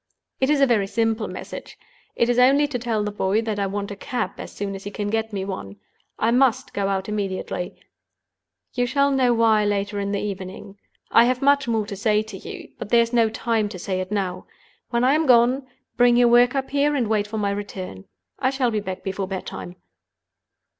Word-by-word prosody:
"It 265 - +2
is 295 -2 +3
a - - +7
very 220 -6 +2
simple 225 0 0
message—it 235 - -6
is 245 0 +2
only 275 +4 +5
to 280 -4 -3
tell 225 -3 -1
the 210 - -2
boy 205 +2 0
that 215 -2 -2
I 200 - 0
want 200 +1 -4
a - - -5
cab 200 -1 -3
as - - -7
soon 200 -1 -4
as 195 0 -7
he 205 - -5
can 205 0 -4
get 225 0 -1
me 195 -2 -3
one. 100 - -6 0.4
I 225 - +2
must 250 -1 +2
go 200 -1 -1
out 195 -1 -1
immediately. 195 -3 -3 1.0
You 245 -1 0
shall 280 +2 +2
know 260 -2 +3
why 220 -2 +4
later 205 0 -1
in 200 0 -2
the 200 - 0
evening. 195 0 -6 0.3
I 230 - +7
have 250 +1 0
much 280 -1 +4
more 225 -2 0
to 205 -1 -6
say 210 +2 +1
to 220 - -9
you; - - -9
but - - -6
there 235 -1 +5
is 230 +1 -6
no 230 -2 +4
time 220 -1 -1
to 200 - -7
say 185 +1 -3
it 185 +2 -6
now. 190 -3 -2 0.4
When 235 0 0
I 260 +2 +4
am 310 0 +1
gone, 250 +2 +4 0.3
bring 240 0 +5
your 245 -1 +5
work 245 +2 +5
up 270 -1 -2
here, 285 +1 +2
and 250 -5 0
wait 210 -1 +1
for 220 +1 -5
my 200 -1 0
return. 190 - -6 0.3
I 260 - +2
shall 265 -3 0
be 215 - 0
back 190 -2 -6
before 195 0 -3
bed 190 -1 -5
time." 175 - -7
220 Hz, 220 wpm, -23 LUFS, 200-245 Hz, 1.0 s, a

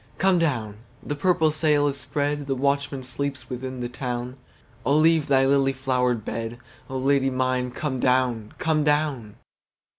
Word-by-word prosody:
Come 185 +1 +3
down! 115 -10 -1 0.3
the - - -3
purple 160 +1 +2
sail 150 -1 +2
is 140 - -1
spread, 145 +1 -2
The 135 - 0
watchman 140 0 -1
sleeps 130 -1 -4
within 130 0 -5
the 120 - -2
town,O 125 +1 -5
leave 160 -1 +4
thy 135 -2 +4
lily 135 0 +3
flowered 125 -4 0
bed,O 120 +3 -6
Lady 135 0 +2
mine 130 -1 0
come 130 +1 -3
down, 125 -4 +1
come 160 -3 +1
down! 145 -7 0
135 Hz, 145 wpm, -24 LUFS, 125-145 Hz, 0.3 s, leave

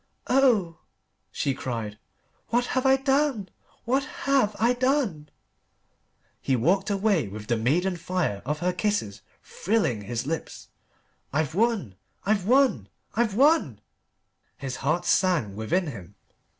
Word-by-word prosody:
"Oh!" 220 -12 +2 0.5
she 140 - -1
cried. 115 -5 -5 0.5
"What 240 +1 +1
have 260 +1 +1
I 265 - +6
done? 270 -6 0 0.4
What 265 +4 +1 0.2
have 265 -7 +2
I 235 +2 +3
done?" 245 - 0 1.1
He 135 - +1
walked 190 - +1
away 195 - +1
with 105 +2 -8
the 120 - 0
maiden 170 +11 +1
fire 170 - -2
of 150 +3 -2
her 180 +1 +1
kisses 180 - -2 0.2
thrilling 190 - -1
his 120 +4 -4
lips. 160 +3 -5 0.6
"I've 155 0 -1
won 200 - 0 0.3
I've 200 -1 +1
won 265 +2 +3 0.2
I've 225 -3 0
won!" 265 - +3 0.8
His 130 -3 -5
heart 155 +6 -1
sang 160 - +2
within 160 - 0
him. 105 - -9
180 Hz, 125 wpm, -26 LUFS, -, 1.1 s, I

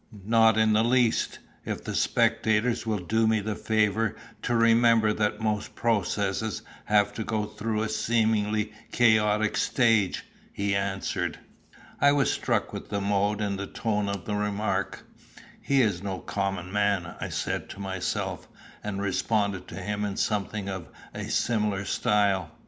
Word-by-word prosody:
"Not 110 0 +5
in 110 -1 +4
the 110 +1 +4
least, 120 -1 +2 0.3
if - - -4
the - - -4
spectators 110 +2 +1
will 110 -1 +1
do 110 +3 +2
me 110 0 +3
the 105 +1 -3
favour 110 0 +1 0.3
to 120 - 0
remember 115 -1 +4
that 105 0 -1
most 105 -1 -2
processes 105 -2 -1 0.2
have 105 -1 +3
to 110 - -4
go 110 -1 -1
through 105 +1 -2
a - - -1
seemingly 110 -1 +1 0.2
chaotic 110 -2 +3
stage," 115 -7 +2 0.3
he 100 0 -1
answered. 95 -2 -2 0.6
I 140 +1 +5
was 140 -4 +2
struck - - -1
with - - -7
the 100 - -1
mode 100 +1 0
and 100 -2 -1 0.2
tone 105 -3 0
of 100 -2 -4
the 105 - -3
remark. 105 +1 -2 0.6
"Here 135 -3 +3
is 95 -5 -1
no 100 -2 -3
common 95 -2 -3
man," 100 -4 0
I - - -3
said - - -3
to 100 - -9
myself, 95 -2 -3 0.4
and 100 -1 -3
responded 100 0 0
to - - -9
him 105 +2 -3
in 100 -1 -3
something 105 -1 -1
of 95 -3 -5 0.3
a - - -5
similar 105 -4 0
style. 100 -5 +1
105 Hz, 150 wpm, -27 LUFS, 100-110 Hz, 0.6 s, Not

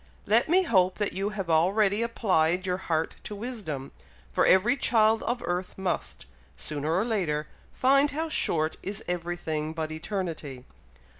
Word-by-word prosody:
Let 225 +7 +3
me 370 +3 +5
hope 185 - +3
that 205 -2 -1
you 195 +2 -1
have 195 -4 -4
already 195 +6 +3
applied 185 -6 +1
your 180 -1 0
heart 160 -1 0
to 210 - -6
wisdom, 200 - -5 0.4
for - - +2
every 210 +7 +5
child 225 -4 +3
of 240 +1 -2
earth 180 +1 -3
must, 190 -2 -3 0.3
sooner 150 +1 -3
or 185 +6 +2
later, 170 -10 -1 0.3
find 275 +3 +3
how 315 +3 -2
short 160 - +1
is 205 +2 -6
every 175 0 -2
thing 155 -2 -3
but 160 -1 -3
eternity. 160 -6 -5
185 Hz, 155 wpm, -27 LUFS, 160-220 Hz, 0.4 s, me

